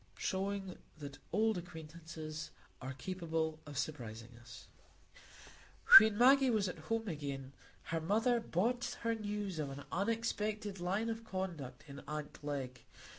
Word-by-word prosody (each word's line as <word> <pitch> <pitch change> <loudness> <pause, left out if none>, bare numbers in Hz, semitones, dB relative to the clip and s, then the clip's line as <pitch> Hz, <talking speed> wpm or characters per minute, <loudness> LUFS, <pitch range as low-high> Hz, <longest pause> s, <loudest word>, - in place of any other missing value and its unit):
Showing 195 - -2 0.2
That 140 -2 -8
Old 220 +1 +2
Acquaintances 160 -2 -7 0.3
Are 130 +1 -4
Capable 160 0 -2
of 145 -2 -7
Surprising 120 -5 -4
Us 120 0 -12 1.3
When 220 -2 +2
Maggie 265 +2 +7
was 215 -4 +2
at 180 - -5
home 225 -1 0
again, 140 -5 -4 0.3
her 165 -1 -2
mother 225 +8 +3
brought 230 +4 0
her 230 0 +1
news 205 -5 -3
of 145 -2 -1
an 140 +1 -7
unexpected 210 -1 -1
line 195 +6 0
of 225 0 -5
conduct 170 - -5
in 140 -1 -8
aunt 150 0 -4
Glegg. 135 -4 -5
175 Hz, 130 wpm, -35 LUFS, 145-215 Hz, 1.3 s, Maggie